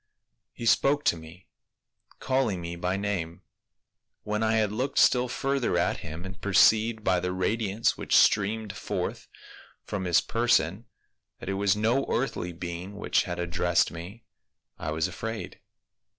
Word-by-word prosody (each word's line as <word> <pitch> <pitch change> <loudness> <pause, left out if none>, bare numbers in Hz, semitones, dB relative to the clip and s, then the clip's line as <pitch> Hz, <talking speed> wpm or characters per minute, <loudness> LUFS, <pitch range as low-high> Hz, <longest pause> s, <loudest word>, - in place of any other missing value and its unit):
He 115 - -8
spoke 140 +5 +3
to - - +3
me, 80 +3 -13 0.7
calling 130 -8 0
me 85 0 -5
by 90 +2 -1
name; 95 -3 -3 0.8
when 105 +1 -2
I 110 0 +2
had 110 -2 +2
looked 130 +6 -3
still 125 0 +5
further 135 +1 -1
at - - +1
him 80 +4 -8
and 95 +1 -9
perceived 110 +3 +4
by 90 -3 +2
the 90 +1 -2
radiance 100 +3 0
which - - +2
streamed 105 0 +2
forth - - -4 0.6
from 95 -2 -4
his 85 -1 +4
person 115 -3 +1 0.5
that - - -7
it - - 0
was 100 0 +2
no 115 +6 +1
earthly 115 -8 -1
being 90 +3 -6
which 105 - +1
had 85 -2 -4
addressed 85 0 +1
me, 90 +8 -9 0.6
I - - -4
was 80 +2 0
afraid. 110 +5 -6
100 Hz, 150 wpm, -27 LUFS, 90-110 Hz, 0.8 s, still